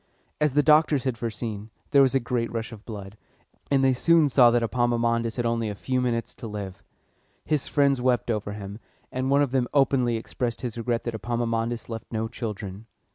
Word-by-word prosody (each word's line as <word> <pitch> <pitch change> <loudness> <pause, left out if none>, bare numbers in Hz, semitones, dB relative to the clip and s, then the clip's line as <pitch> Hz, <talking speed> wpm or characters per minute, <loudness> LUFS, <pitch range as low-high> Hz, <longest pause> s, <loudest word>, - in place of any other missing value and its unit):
As 150 -3 +2
the 145 +1 +4
doctors 150 -2 +4
had 130 -3 -1
foreseen, 110 -2 -5 0.2
there 140 - +6
was 135 0 +3
a - - +5
great 120 -1 -2
rush 115 0 -4
of 110 -2 -11
blood, 105 -2 -8 0.5
and 135 -1 +3
they 130 -1 +4
soon 160 +3 +4
saw 125 -1 +6
that 120 0 +2
Epaminondas 115 -1 +1
had 120 - -2
only 115 -1 0
a 105 - -5
few 130 +5 -1
minutes 115 -2 -1
to 115 - -8
live. 100 -3 -6 0.6
His 150 -3 0
friends 140 -3 +2
wept 125 -2 +1
over 105 -2 -2
him, 100 0 -7 0.3
and 130 +1 -2
one 140 +1 +4
of 140 - -2
them 130 -2 +1
openly 130 -4 +3
expressed 120 +1 -4
his 120 -3 -4
regret 120 0 -1
that 120 - -3
Epaminondas 115 +1 -2
left 115 -1 -7
no 110 -1 -1
children. 105 -3 -6
120 Hz, 195 wpm, -26 LUFS, 115-130 Hz, 0.6 s, there